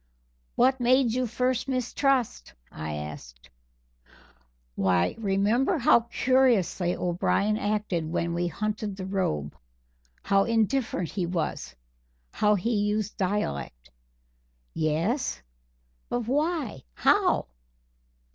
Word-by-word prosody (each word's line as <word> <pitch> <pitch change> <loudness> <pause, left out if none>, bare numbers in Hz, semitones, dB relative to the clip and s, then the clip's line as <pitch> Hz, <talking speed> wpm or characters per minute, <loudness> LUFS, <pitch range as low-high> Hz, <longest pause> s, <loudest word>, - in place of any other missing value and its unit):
"What 260 +2 +3
made 250 -1 +3
you 255 0 0
first 250 +2 -1
mistrust?" 255 - 0 0.2
I 80 -1 -5
asked. - - -9 1.2
"Why, 90 +2 +1
remember 215 - +1
how 240 - +5
curiously 235 -10 +2
O'Brien 185 +4 0
acted 205 -6 -1
when 170 0 -1
we 175 +1 0
hunted 210 +2 -3
the 190 -1 -6
robe 130 - -2 0.7
how 195 0 +3
indifferent 225 - 0
he 180 -4 -2
was 170 -2 -3 0.6
how 210 0 +3
he 225 +5 -1
used 210 +1 -1
dialect!" 70 - -3 0.8
"Yes, 165 - 0 0.7
but 245 - -1
why 290 +2 -1
how?" - - +3
205 Hz, 100 wpm, -27 LUFS, 170-245 Hz, 1.2 s, how